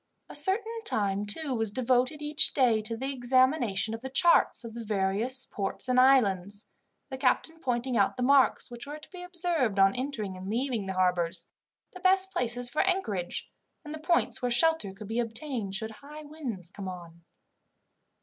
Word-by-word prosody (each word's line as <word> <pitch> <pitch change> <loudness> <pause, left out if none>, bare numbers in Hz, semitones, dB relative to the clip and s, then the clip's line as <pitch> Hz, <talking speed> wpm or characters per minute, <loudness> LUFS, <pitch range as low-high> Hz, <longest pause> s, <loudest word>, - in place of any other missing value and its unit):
A - - -9
certain 445 +4 0
time, 205 - -1
too, 280 +6 0
was 225 -3 -1
devoted 255 +5 0
each 295 0 +3
day 240 -5 +3
to 225 +1 -6
the 270 +3 -3
examination 250 -4 +1
of 225 - -6
the 265 - -6
charts 335 0 +4
of 230 -1 -8
the 235 0 -7
various 215 +5 +1
ports 200 +5 -3
and 255 0 +3
islands, 205 -7 +2 0.5
the 265 - -6
captain 305 +5 0
pointing 250 -2 -2
out 205 +3 +1
the 250 - -2
marks 270 -1 +3
which 240 +3 -8
were 295 +1 -6
to 305 - -15
be 365 -1 -10
observed 345 - -1
on 195 0 +5
entering 245 -7 -4
and 185 +1 -8
leaving 235 -3 -2
the 190 - -3
harbours, 180 -2 +1 0.4
the 370 - -10
best 380 +1 +5
places 245 0 0
for 245 - 0
anchorage, 220 - -2 0.3
and 300 - -7
the 310 - -7
points 340 -2 0
where 250 - 0
shelter 280 -3 +2
could 195 +2 -11
be 225 +3 -2
obtained 230 -3 -4
should 220 +2 -3
high 295 +7 -12
winds 255 - -6
come 200 -1 -8
on. 170 -2 -9
245 Hz, 180 wpm, -28 LUFS, 205-295 Hz, 0.5 s, on